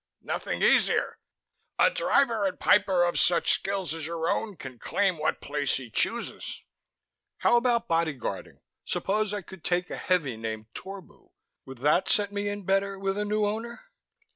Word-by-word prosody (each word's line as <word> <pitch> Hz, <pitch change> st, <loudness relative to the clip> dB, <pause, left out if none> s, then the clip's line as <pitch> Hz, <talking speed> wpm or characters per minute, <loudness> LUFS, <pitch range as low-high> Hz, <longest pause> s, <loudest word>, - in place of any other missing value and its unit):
"Nothing -, -, -3 dB
easier. -, -, +3 dB, 0.6 s
A -, -, +5 dB
Driver 240 Hz, -, +2 dB
and 185 Hz, -, -5 dB
Piper 190 Hz, -3 st, +4 dB
of 175 Hz, 0 st, +1 dB
such 175 Hz, -1 st, +3 dB
skills 195 Hz, -4 st, -1 dB
as 165 Hz, -1 st, -6 dB
your 165 Hz, -1 st, -2 dB
own 205 Hz, +1 st, -1 dB
can 130 Hz, -3 st, -9 dB
claim 190 Hz, -, 0 dB
what 155 Hz, -, -1 dB
place 145 Hz, -1 st, -1 dB
he 125 Hz, -4 st, -9 dB
chooses." -, -, -2 dB, 0.7 s
"How -, -, +3 dB
about 235 Hz, -1 st, +2 dB
bodyguarding? 165 Hz, -5 st, -2 dB, 0.2 s
Suppose 210 Hz, +1 st, -1 dB
I 205 Hz, -2 st, -3 dB
could 190 Hz, -1 st, -13 dB
take 180 Hz, 0 st, 0 dB
a -, -, -4 dB
heavy 150 Hz, -11 st, 0 dB
named 110 Hz, 0 st, -6 dB
Torbu; 195 Hz, -1 st, -10 dB, 0.4 s
would 130 Hz, -1 st, -10 dB
that 150 Hz, +6 st, +3 dB
set 205 Hz, -3 st, +3 dB
me 205 Hz, 0 st, -2 dB
in 205 Hz, 0 st, -5 dB
better 195 Hz, +1 st, +1 dB
with 195 Hz, 0 st, -1 dB
a 210 Hz, 0 st, -1 dB
new 210 Hz, 0 st, +1 dB
Owner?" 225 Hz, +3 st, -5 dB
190 Hz, 165 wpm, -27 LUFS, 160-205 Hz, 0.7 s, A